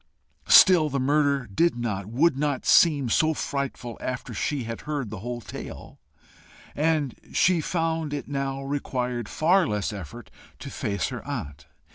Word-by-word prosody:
Still 175 -6 +7
the 140 -1 -1
murder 140 0 +2
did 165 - +1
not, 105 -5 -3
would 140 +7 +2
not 145 -1 -1
seem 145 -6 +5
so 155 +7 +2
frightful 135 -5 -4
after 130 -1 -4
she 145 -4 -2
had 115 0 -6
heard 145 -8 -4
the 105 - -6
whole 120 +3 -5
tale, - - -9 0.8
and 150 -3 +1 0.2
she 180 -2 +3
found 165 -2 -1
it 145 -1 -4
now 135 -1 -3
required 125 -4 -3
far 180 +4 +3
less 105 0 -2
effort 90 -8 -9 0.3
to - - -9
face 100 -2 -2
her - - -6
aunt. 70 0 -6
135 Hz, 150 wpm, -25 LUFS, 115-155 Hz, 0.8 s, Still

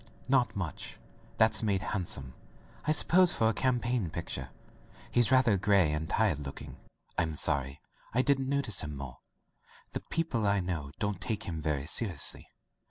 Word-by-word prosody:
'* - - -26
"Not 130 -2 +2
much. 90 -6 -4 0.4
That's 110 0 +4
made 100 -3 0
handsome, 70 -9 -3 0.5
I - - +4
suppose, 175 +3 +5
for 110 - +2
a - - +1
campaign 120 -4 0
picture. 70 -6 -5 0.6
He's 120 0 +3
rather 125 -6 +5
gray 95 -4 +3
and 75 +1 -3
tired 105 -10 +2
looking. 70 -2 -8 0.4
Fm 80 -2 0
sorry 70 0 +2 0.3
I 125 +3 +2
didn't 135 -2 +1
notice 140 -8 +1
him 75 -1 -5
more. 65 -3 -8 0.7
The - - -3
people 135 -10 -1
I 100 0 +3
know 85 -6 -3
don't 105 -3 -2
take 110 +1 -3
him 80 -5 -4
very 75 -2 -1
seriously. 85 -4 -2
100 Hz, 160 wpm, -30 LUFS, 75-120 Hz, 0.7 s, suppose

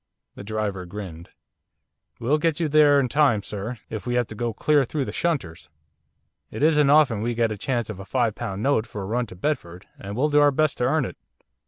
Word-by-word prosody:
The - - -10
driver 100 -3 -3
grinned. 90 -3 -8 0.9
'We'll 140 +6 +1
get 165 0 0
you 165 - +1
there 145 -1 +5
in 135 - +1
time, 125 -5 +2
sir, 105 +5 -5
if 110 +2 -6
we 120 - 0
have 125 0 +2
to - - -7
go 120 +1 -2
clear 145 +6 +2
through 135 +2 -2
the - - -5
shunters. 85 - -2 0.8
It - - -4
isn't 150 -2 +4
often 140 -8 +4
we 120 +1 -1
get 115 -1 +1
a - - -2
chance 120 +1 -2
of 110 -3 -7
a - - -7
five 120 0 0
pound 100 +1 -5
note 130 -5 +1
for 100 -1 -6
a - - -5
run 120 +4 -1
to 90 - -11
Bedford, 90 - -3
and 100 +1 -7
we'll 150 +4 +2
do 150 0 +4
our 145 0 +6
best 150 +1 0
to 125 - +1
earn 155 0 +2
it. - - -8
120 Hz, 225 wpm, -24 LUFS, 105-145 Hz, 0.9 s, our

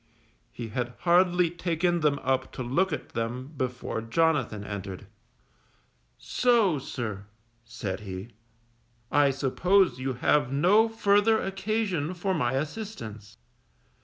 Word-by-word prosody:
He 115 -2 -7
had 120 +2 -3
hardly 175 -1 +4
taken 175 0 0
them 150 -2 +2
up 130 0 0
to 130 - -4
look 175 +10 +1
at 155 - -4
them 125 +5 -4
before 125 -3 -3
Jonathan 130 -4 +1
entered. 100 -2 -6 1.1
So, 225 - +2
sir, 110 -7 -5 0.4
said 110 -5 -5
he, 95 +1 -7 0.8
_I 145 -1 +4
suppose 175 +6 +2
you 130 0 -2
have 135 +2 +2
no 195 +11 +4
further 220 0 +3
occasion 195 -4 -2
for 190 +2 -1
my 120 -7 0
assistance. 130 - -5
145 Hz, 115 wpm, -27 LUFS, 120-185 Hz, 1.1 s, hardly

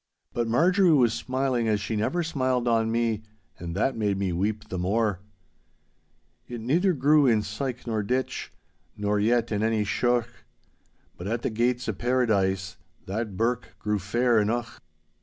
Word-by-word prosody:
But 120 -1 -1
Marjorie 175 - +4
was 120 -6 +4
smiling 130 -2 -1
as 105 -2 +2
she 105 +2 -3
never 170 +12 0
smiled 130 -6 0
on 115 -1 +2
me, 115 -2 0 0.4
and 85 0 -5
that 125 +7 +1
made 105 -3 0
me 95 -2 -1
weep 105 +5 -2
the 95 - -3
more. 100 +1 0 1.3
'It 120 -1 -6
neither 170 - +2
grew 145 0 +4
in 110 -3 +3
syke 120 +5 -4
nor 110 -3 -1
ditch 125 +6 -2 0.5
Nor 105 0 0
yet 115 +2 +2
in 105 -1 0
any 110 -1 +1
sheuch, 120 +3 +1 0.9
But 90 - -6
at 115 +2 -2
the - - -1
gates 120 +3 0
o' 110 - 0
Paradise, 95 -6 0 0.3
_That 105 0 -4
birk 120 +3 -1
grew 105 -1 -1
fair 120 +5 +2
eneuch. 115 +3 -2
115 Hz, 160 wpm, -26 LUFS, 105-125 Hz, 1.3 s, Marjorie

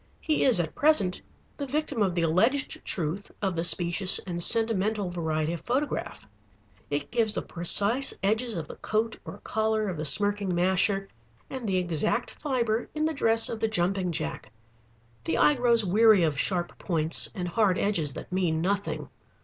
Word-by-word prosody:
He 310 -2 0
is 250 -8 +5
at 160 -2 -2
present 285 -12 +2 0.4
the 280 - -5
victim 285 -3 -2
of 190 -4 +1
the 170 - 0
alleged 225 - +1
truth 175 +3 -2
of 190 -3 -2
the 165 - -1
specious 175 +2 +3
and 175 -2 -4
sentimental 215 -2 +3
variety 160 -2 -2
of 170 - -6
photograph. 260 - -3 0.6
It 145 0 -3
gives 225 -3 +1
the - - -2
precise 205 +9 +3
edges 220 +3 0
of 160 -3 -5
the - - -10
coat 220 +1 -2
or - - -8
collar 220 -1 -1
of 180 - -5
the 155 - -4
smirking 205 +4 +1
masher 190 +2 +1 0.4
and 255 -5 -5
the 190 - +1
exact 180 +6 0
fibre 240 -6 -2
in 305 0 0
the 320 - -1
dress 225 -5 +2
of 225 - -5
the 225 - 0
jumping 185 -2 -1
jack. 155 -8 -5 0.7
The 160 - -1
eye 295 - +5
grows 235 -4 +2
weary 210 0 +4
of 155 -3 0
sharp 175 -1 -2
points 165 -3 -1
and 180 -2 -4
hard 190 0 +1
edges 165 -9 -1
that - - -9
mean 175 -4 0
nothing. 200 +4 -2
200 Hz, 175 wpm, -27 LUFS, 175-225 Hz, 0.7 s, is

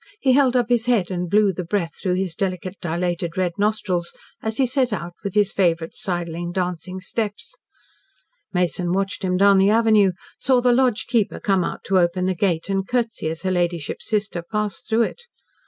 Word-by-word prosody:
He 265 - +3
held 260 -1 +4
up 245 -2 +2
his 240 -1 +2
head, 215 -7 +2
and 180 -1 -2
blew 205 0 +4
the 180 +1 -4
breath 170 -1 -1
through 180 -2 0
his 185 -2 -1
delicate, 185 +1 -3
dilated, 175 0 -2
red 185 -2 +1
nostrils 205 -5 0 0.3
as 220 0 -3
he 270 - +3
set 255 -1 +1
out 175 -4 -4
with 200 -1 -4
his 205 -2 +3
favourite 170 -3 +1
sidling, 175 -1 -3
dancing 180 0 -3
steps. 210 - -4 1.0
Mason 180 -1 0
watched 195 0 -1
him 180 -1 +1
down 200 0 +5
the 195 +1 +4
avenue, 215 -3 +4 0.3
saw 260 -1 +3
the 245 0 +3
lodge 250 -3 +2
keeper 230 -4 0
come 195 -3 +1
out - - -4
to 190 -1 +2
open 175 +1 +1
the 185 - +1
gate, 170 -2 0
and 195 -1 -1
curtsy 230 -9 -1
as 165 +1 -6
her 185 - 0
ladyship's 175 -4 -2
sister 205 -5 -1
passed 210 +3 -4
through 225 +1 +3
it. 480 - -4
190 Hz, 190 wpm, -22 LUFS, 175-215 Hz, 1.0 s, down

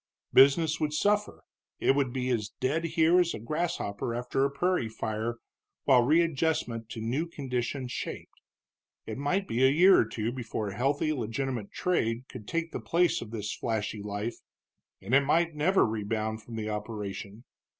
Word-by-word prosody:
Business 155 +3 +5
would 150 -2 -1
suffer; 205 +6 +1 0.4
it - - +4
would 140 -3 +1
be 130 0 -1
as 105 -4 -1
dead 150 +6 0
here 165 +2 +4
as 175 -1 +1
a - - -6
grasshopper 115 -5 -2
after 125 +2 -1
a 140 - +3
prairie 140 -3 0
fire 110 +1 -3 0.5
while 130 -2 +6
readjustment 150 -5 +1
to 115 - -6
new 125 +9 -1
conditions 130 -3 -3
shaped. - - -6 0.6
It - - -5
might 185 +8 0
be 120 +3 +1
a 130 - +7
year 180 +7 +6
or - - +3
two 115 +1 -3
before 115 -4 -4
healthy 140 +8 0
legitimate 120 -2 -3
trade 125 -9 -1
could 110 -5 -10
take 165 0 -2
the - - -4
place 175 +1 +1
of 115 - -7
this 105 -2 -4
flashy 110 -2 -3
life, 105 +3 -4 0.7
and 105 +6 -4
it 140 - +7
might 165 +4 +2
never 175 +6 +3
rebound 110 0 -2
from 115 +1 -9
the 110 -1 -3
operation. 105 0 -5
125 Hz, 165 wpm, -29 LUFS, 110-155 Hz, 0.7 s, a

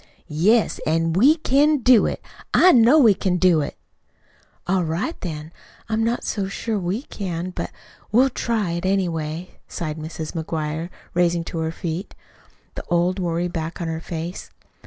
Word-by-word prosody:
"Yes, 195 +9 +2
an' 165 +1 +1
we 260 - +5
can 300 0 +3
do 250 -4 +5
it. - - -4 0.3
I 370 - +7
know 245 +1 +6
we 235 -9 +7
can 185 -1 0
do 175 -3 +4
it." 145 - -5 0.9
"All 185 0 +1
right, 170 - -2
then. 155 -3 -5 0.4
I'm 220 0 +1
not 235 +2 0
so 200 -3 -2
sure 215 +2 -3
we 190 +7 -2
can, 185 - -5
but - - -4 0.4
we'll 255 +5 +4
try 220 -7 -1
it, 170 0 -3
anyway," 175 -3 -2
sighed 155 -2 -5
Mrs. 155 0 -6
McGuire, 160 0 -3 0.2
rising 175 -1 +2
to 165 - -5
her 160 0 -1
feet, 170 +3 -5 0.6
the - - -6
old 175 +2 +1
worry 175 -1 -1
back 165 -1 -5
on 170 - -3
her 160 0 -4
face. 170 +2 -6
175 Hz, 160 wpm, -22 LUFS, 165-215 Hz, 0.9 s, I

